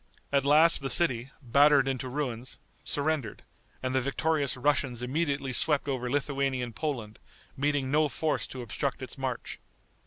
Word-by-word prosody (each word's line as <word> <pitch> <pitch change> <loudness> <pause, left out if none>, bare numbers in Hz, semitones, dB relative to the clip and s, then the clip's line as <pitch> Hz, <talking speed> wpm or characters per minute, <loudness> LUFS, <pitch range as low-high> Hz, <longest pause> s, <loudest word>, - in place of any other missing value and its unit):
At 140 -1 +2
last 155 +2 +6
the 135 - -2
city, 130 -8 +2
battered 140 +2 +5
into 130 -1 -2
ruins, 125 -3 -4 0.3
surrendered, 145 -6 -2 0.4
and 130 0 -1
the 130 - +2
victorious 140 +1 0
Russians 130 -3 0
immediately 140 0 -1
swept 145 +3 +2
over 125 -3 -2
Lithuanian 135 -3 -1
Poland, 120 -9 -4 0.4
meeting 140 -1 0
no 150 0 +3
force 155 +1 -1
to 130 -2 -7
obstruct 115 - -3
its - - -6
march. - - -4
140 Hz, 145 wpm, -29 LUFS, 125-145 Hz, 0.4 s, last